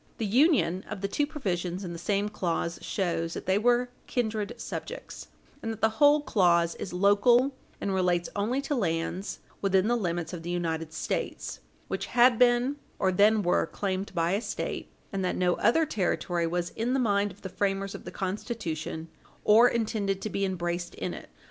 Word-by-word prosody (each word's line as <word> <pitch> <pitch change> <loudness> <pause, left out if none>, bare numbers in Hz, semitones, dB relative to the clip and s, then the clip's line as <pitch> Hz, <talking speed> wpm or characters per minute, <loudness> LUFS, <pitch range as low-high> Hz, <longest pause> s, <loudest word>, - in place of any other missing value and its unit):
The 225 - -1
union 225 - +3
of 210 -3 -5
the 200 - 0
two 290 +8 0
provisions 185 - -3
in 175 -2 -5
the 170 - -7
same 200 +3 0
clause 170 -4 -2
shows 170 -3 -1
that - - -6
they 190 +2 +2
were 245 +2 +3 0.2
kindred 220 -2 -1
subjects, - - -7 0.3
and 225 - -3
that 220 - -7
the 220 - +5
whole 290 +1 +7
clause 170 - +3
is 190 - -6
local, 205 +8 +4 0.3
and 195 - -1
relates 180 -2 +1
only 230 +7 0
to 280 +1 -2
lands 180 - -2 0.2
within 195 0 +3
the 240 - +3
limits 175 -6 -2
of 175 - -5
the 170 - -6
United 165 -2 -2
States - - -3 0.3
which - - -3
had 240 -1 +5
been 250 +3 +4 0.2
or 190 -2 +2
then 210 +3 +4
were 175 -2 +2
claimed 190 +3 -3
by 170 0 +1
a 200 +3 +1
State, - - -4 0.2
and 195 -1 -1
that 180 - 0
no 180 -1 +2
other 315 +9 +3
territory 175 - 0
was 175 +1 -2
in 240 +4 -1
the - - +2
mind 205 -4 +2
of 190 - -17
the - - -3
framers 195 +1 -1
of - - -8
the - - -7
Constitution 185 -5 -4 0.4
or 230 +4 +7
intended 210 -4 -1
to 215 - -3
be 200 - -1
embraced 175 -2 -3
in - - -3
it. - - -9
195 Hz, 185 wpm, -28 LUFS, 175-230 Hz, 0.4 s, whole